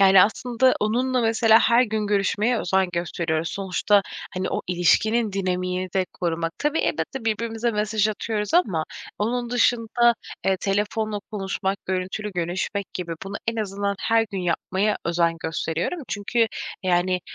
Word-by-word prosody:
Yani, 190 -1 +8
aslında, 250 +4 +2
onunla, 250 +4 +1
mesela, 225 -1 +5
her 235 +1 +5
gün 215 -3 -1
görüşmeye 205 +4 +1
özen 190 0 +1
gösteriyoruz. 170 -1 -1
Sonuçta, 200 +1 +1 0.3
hani, 185 0 -2
o - - -1
ilişkinin 210 +5 +2
dinamiğini 185 -1 -2
de 190 -2 +1
korumak. 165 -1 -2
Tabii 295 +2 0
elbette, 265 -6 -2
birbirimize 225 +1 -1
mesaj 215 0 +1
atıyoruz 215 +3 -2
ama 185 - +3 0.3
onun 240 +3 -1
dışında, 240 0 +3 0.3
eee, 190 -1 +3
telefonla 210 +2 -1
konuşmak, 195 -1 -2
görüntülü 190 +3 -2
görüşmek 180 +3 -3
gibi, 175 -2 -4
bunu 195 - -6
en 230 - +1
azından 200 -1 -2
her 225 0 +2
gün 195 - -3
yapmaya 185 +4 0
özen 170 -1 +1
gösteriyorum. 165 - -2
Çünkü 225 +3 +1 0.4
yani, 180 0 +1
200 Hz, 140 wpm, -24 LUFS, 185-225 Hz, 0.4 s, Yani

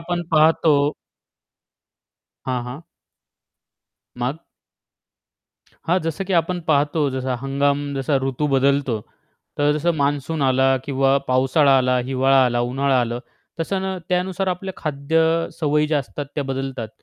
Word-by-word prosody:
आपण 175 +1 -3
पाहतो. 155 -2 +4 1.5
हां, 125 -2 -1
हां. 125 +6 -8 1.4
मग? 130 +6 -3 1.5
हां, 180 +3 +3
जसं 165 +4 -3
की 190 - -4
आपण 175 +2 -2
पाहतो. 150 +1 +2
जसा 130 -1 -2
हंगाम, 140 +2 0 0.2
जसा 135 +1 0
ऋतू 135 +2 -1
बदलतो, 135 -2 +2 0.6
तर 145 0 +3
जसं 170 +3 +1
मान्सून 145 +2 -1
आला 135 0 +3
किंवा 135 0 +2
पावसाळा 135 +2 +4
आला, 125 0 +2
हिवाळा 135 0 +4
आला, 120 -1 +1
उन्हाळा 135 -1 +2
आलं, 120 0 -2 0.4
तसं 190 +4 -1
ना 190 0 -2
त्यानुसार 185 +1 -1
आपल्या 185 +1 -3
खाद्य 155 +1 -1 0.4
सवयी 150 0 +2
ज्या 150 -1 +1
असतात, 140 +1 -6
त्या 145 - -2
बदलतात. 135 -4 -4
140 Hz, 125 wpm, -21 LUFS, 130-160 Hz, 1.5 s, पाहतो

